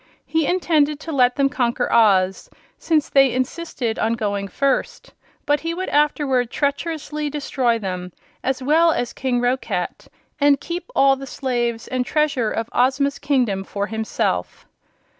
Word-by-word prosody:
He 320 -2 0
intended 305 -5 +2
to 325 - -6
let 250 -4 +3
them 275 -1 +3
conquer 250 -4 -1
Oz, 190 -4 +3 0.3
since 310 -3 +1
they 270 -2 +4
insisted 255 -2 -3
on 225 - +1
going 205 -3 -2
first; 275 +6 -1 0.3
but 290 0 +2
he 330 +1 -3
would 370 +1 -3
afterward 285 -4 +1
treacherously 300 +2 -2
destroy 270 -5 0
them, 185 -3 -5 0.3
as 265 0 -1
well 325 +5 +4
as 245 -6 -2
King 250 -2 -1
Roquat, 250 +2 -2 0.3
and 285 -1 +4
keep 350 +8 -6
all 275 0 +5
the 270 0 -9
slaves 240 -4 -2
and 255 -1 -1
treasure 280 -4 0
of 225 0 -3
Ozma's 270 +3 +1
kingdom 250 -9 0
for 200 +1 -3
himself. 220 +1 -2
265 Hz, 145 wpm, -21 LUFS, 235-295 Hz, 0.3 s, all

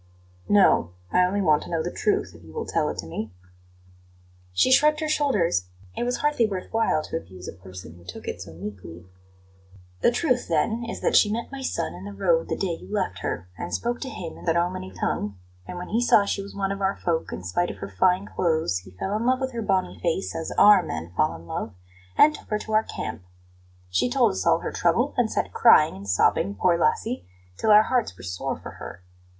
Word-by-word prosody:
"No; 185 - +4 0.2
I 180 - +4
only 200 +2 -1
want 155 -3 +4
to - - -9
know 165 -2 -1
the 175 - -3
truth, 210 - 0
if 85 0 -15
you 80 -1 -14
will - - -4
tell - - 0
it - - -5
to - - -5
me." 105 +6 -5 1.2
She 90 - +3
shrugged 300 +3 +5
her 310 - -2
shoulders; 210 - +1 0.3
it - - -3
was 245 0 0
hardly 295 -6 +2
worth 190 -3 -5
while 225 -8 +2
to - - -3
abuse 95 - -10
a - - -6
person 90 -3 -11
who 85 0 -17
took 90 0 -9
it - - -4
so - - -9
meekly. 90 -2 -9 1.0
"The - - +5
truth, 250 0 0
then, 230 +1 0
is - - -6
that - - +1
she 205 - +5
met 235 +4 -3
my 275 -1 -6
son 85 - -2
in 90 +2 -9
the 100 - -7
road 165 - +1
the - - -1
day 175 -4 -2
you - - -12
left 100 - -1
her, 90 -2 -4
and 85 - -5
spoke 240 +1 -2
to 265 - -4
him 170 -9 -7
in - - -12
the 165 -1 +2
Romany 170 - -1
tongue; 100 +1 -2 0.3
and 180 - -6
when 180 - -6
he 230 +3 +1
saw 225 -4 +5
she 200 - -1
was 200 - -10
one 195 -1 -1
of 200 0 -4
our 195 0 +1
folk, 165 -2 -2
in - - -6
spite 90 - 0
of - - -7
her 100 - -6
fine 185 +2 +3
clothes, 160 - 0
he 95 +1 -14
fell 195 - -2
in 225 +3 -1
love 255 0 +3
with 265 -1 -2
her 235 -2 -4
bonny 195 -3 0
face, 175 +2 -1
as 165 0 -4
OUR 205 -2 +8
men 85 - -6
fall 85 - +1
in 80 +1 -12
love, 105 +4 -5 0.4
and 305 - +7
took - - -12
her 210 - +1
to 215 +1 -6
our 215 - +5
camp. 110 - -6 0.7
She 125 +8 +2
told - - +3
us 95 0 -3
all - - +4
her - - -3
trouble, - - +1
and - - +1
sat - - -2
crying - - +6
and 100 +1 -9
sobbing, 100 +2 +2
poor 170 - +3
lassie, 195 - 0 0.3
till 220 - -1
our 210 0 +8
hearts 240 - -1
were - - -12
sore 90 -1 -3
for - - -9
her. 90 - -9
175 Hz, 235 wpm, -25 LUFS, -, 1.2 s, OUR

